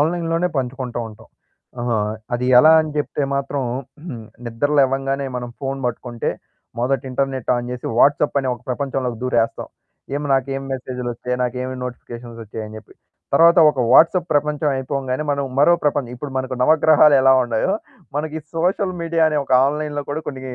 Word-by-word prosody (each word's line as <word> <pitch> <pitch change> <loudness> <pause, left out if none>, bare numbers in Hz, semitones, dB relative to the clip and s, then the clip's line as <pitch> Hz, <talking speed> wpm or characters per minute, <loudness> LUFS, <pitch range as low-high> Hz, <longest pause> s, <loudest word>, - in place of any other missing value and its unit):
Online 165 +2 0
లోనే 180 +2 +1
పంచుకుంటూ 125 -1 -3
ఉంటాం. 110 +1 -16 0.5
ఆహా! 120 -2 0 0.4
అది 125 +1 -2 0.2
ఎలా 155 +3 +7
అని 155 -1 -3
జెప్తే 145 -1 -1
మాత్రం, 140 0 -2 0.8
నిద్ర 120 +6 -1
లేవంగానే 135 +1 0
మనం 120 0 -6
ఫోను 135 0 -3
పట్టుకుంటే, 120 0 -4 0.5
మొదట 135 +1 0
ఇంటర్నెట్ 135 -1 -2
ఆన్ 120 0 -4
చేసి, 125 - -6
వాట్సాప్ 145 +1 +3
అనే 130 - -3
ఒక 120 - -15
ప్రపంచంలోకి 130 -3 -2
దూరేస్తాం. 115 -3 0 0.5
ఏం 145 - -3
నాకేం 135 +1 0
మెసేజులొచ్చాయి, 125 -1 -4
నాకేమి 125 +1 -3
నోటిఫికేషన్సొచ్చాయి 115 -3 -8
అని 110 0 -10
చెప్పి. 110 - -18 0.4
తరువాత 170 +3 +6
ఒక 135 - -3
వాట్సాప్ 170 +4 +5
ప్రపంచం 150 0 +1
అయిపోగానే, 130 +1 -3
మనం 140 -1 0
మరో 170 +4 +6
ప్రపంచం 140 -4 0
ఇప్పుడు 140 +2 -7
మనకు 130 0 -3
నవగ్రహాలు 155 0 +5
ఎలా 135 0 +6
ఉన్నాయో, 120 +9 0 0.4
మనకి 155 +1 -3 0.2
సోషల్ 185 +2 0
మీడియా 165 -1 +1
అనే 150 -1 0
ఒక 135 - -4
ఆన్‌లైన్ 150 0 -3
కూడా 155 +2 -2
కొన్ని 135 -2 -6
135 Hz, 150 wpm, -20 LUFS, 125-150 Hz, 0.8 s, ఎలా